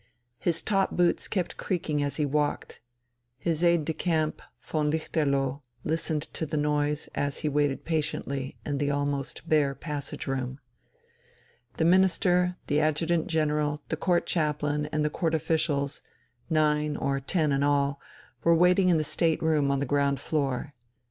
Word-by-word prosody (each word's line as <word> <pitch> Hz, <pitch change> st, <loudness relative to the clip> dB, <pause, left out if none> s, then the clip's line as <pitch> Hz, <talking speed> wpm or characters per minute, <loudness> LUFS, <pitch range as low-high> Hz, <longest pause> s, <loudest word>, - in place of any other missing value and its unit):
His 170 Hz, -1 st, +1 dB
top 195 Hz, -2 st, +2 dB
boots 175 Hz, -1 st, +2 dB
kept 185 Hz, -4 st, -2 dB
creaking 165 Hz, -6 st, -1 dB
as 140 Hz, -1 st, -1 dB
he 150 Hz, -, +1 dB
walked. 145 Hz, +1 st, -1 dB, 0.6 s
His 165 Hz, +3 st, -1 dB
aide 170 Hz, -3 st, +4 dB
de 160 Hz, -, -1 dB
camp, 155 Hz, -1 st, -1 dB, 0.2 s
von 150 Hz, -1 st, -1 dB
Lichterloh, 140 Hz, -3 st, 0 dB, 0.2 s
listened 160 Hz, -1 st, -1 dB
to 160 Hz, -, -3 dB
the 150 Hz, -, -2 dB
noise, 150 Hz, 0 st, 0 dB
as 140 Hz, -1 st, -2 dB
he 150 Hz, -, 0 dB
waited 145 Hz, -1 st, 0 dB
patiently 140 Hz, -4 st, -2 dB
in 145 Hz, -2 st, -2 dB
the 145 Hz, 0 st, +1 dB
almost 145 Hz, -1 st, -2 dB
bare 145 Hz, -3 st, +2 dB
passage 145 Hz, -1 st, -5 dB
room. 130 Hz, -1 st, -3 dB, 1.2 s
The 160 Hz, -, +2 dB
Minister, 180 Hz, 0 st, +3 dB
the 145 Hz, 0 st, +1 dB
Adjutant 155 Hz, +2 st, +1 dB
General, 150 Hz, -2 st, 0 dB
the -, -, 0 dB
Court 175 Hz, -2 st, +1 dB
Chaplain, 150 Hz, -2 st, 0 dB
and 150 Hz, 0 st, -1 dB
the 150 Hz, -, 0 dB
Court 165 Hz, 0 st, 0 dB
officials, 155 Hz, -3 st, 0 dB, 0.5 s
nine 150 Hz, -2 st, +2 dB
or 140 Hz, 0 st, 0 dB
ten 150 Hz, +2 st, 0 dB
in 140 Hz, 0 st, +1 dB
all, 140 Hz, -1 st, +1 dB, 0.4 s
were 170 Hz, 0 st, +5 dB
waiting 180 Hz, +2 st, +4 dB
in 170 Hz, -, +4 dB
the 155 Hz, -, +1 dB
state 160 Hz, +2 st, +1 dB
room 155 Hz, -3 st, +2 dB
on 140 Hz, 0 st, +1 dB
the -, -, 0 dB
ground 140 Hz, 0 st, +1 dB
floor. 140 Hz, -2 st, -2 dB
150 Hz, 155 wpm, -27 LUFS, 145-165 Hz, 1.2 s, were